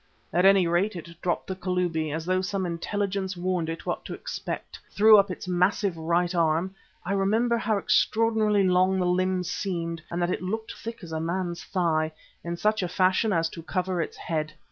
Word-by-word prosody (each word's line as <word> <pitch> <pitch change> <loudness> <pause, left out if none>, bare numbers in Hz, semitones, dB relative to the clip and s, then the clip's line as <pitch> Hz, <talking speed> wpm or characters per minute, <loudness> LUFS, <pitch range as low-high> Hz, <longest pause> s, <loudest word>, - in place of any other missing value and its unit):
At 180 +2 +3
any 195 -2 +6
rate 175 +5 +1
it 170 -1 -8
dropped 175 -2 -1
the 190 - -4
Kalubi, 180 -4 -1
and 150 - -3
as 160 0 -4
though 185 +1 +1
some 190 0 -2
intelligence 190 +2 -2
warned 175 -2 -1
it 165 - -5
what - - -2
to - - -5
expect, - - -6
threw 215 +1 +7
up 200 0 +2
its 180 - -6
massive 180 +1 +1
right 170 +2 0
arm 170 +2 +1 0.3
I 195 - -1
remember 220 +5 +2
how 220 -2 +1
extraordinarily 215 0 +2
long 185 +1 +3
the 185 - +1
limb 185 +1 +1
seemed 170 -2 -3
and 170 - -3
that 175 0 +1
it - - -2
looked 220 +5 -3
thick 230 -2 -8
as 165 - -9
a 160 - -2
man's 175 +1 -2
thigh 160 -3 0 0.3
in 170 0 -4
such 215 +3 +1
a 180 - -1
fashion 185 +4 +2
as 165 -3 +2
to 165 - -9
cover 180 +1 -1
its 155 - -5
head. 155 -2 -3
180 Hz, 200 wpm, -26 LUFS, 170-195 Hz, 0.3 s, threw